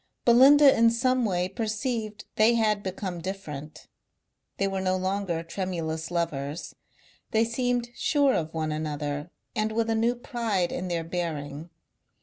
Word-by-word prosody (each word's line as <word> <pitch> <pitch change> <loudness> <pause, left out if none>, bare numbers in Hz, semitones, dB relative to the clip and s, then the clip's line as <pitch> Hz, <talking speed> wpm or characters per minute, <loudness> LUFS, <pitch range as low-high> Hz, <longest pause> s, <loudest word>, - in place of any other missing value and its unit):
Belinda 270 +4 +7
in 230 0 +5
some 250 +1 +1
way 180 -3 0
perceived 215 +1 -3
they 225 +2 +5
had 215 -2 +2
become 185 -2 -4
different. 160 -6 -7 0.7
They 195 - +1
were 195 -1 -2
no 185 0 +1
longer 185 -3 -1
tremulous 165 -3 -3
lovers; 160 -3 -3 0.6
they 225 +1 +3
seemed 245 0 -1
sure 285 -1 +2
of 160 -1 -1
one 155 -1 -2
another 150 0 -3 0.3
and 215 0 0
with 225 +1 0
a - - +2
new 230 +2 +2
pride 230 -8 -1
in 185 - -3
their 170 -2 -1
bearing. 160 -3 -4
195 Hz, 140 wpm, -27 LUFS, 165-230 Hz, 0.7 s, Belinda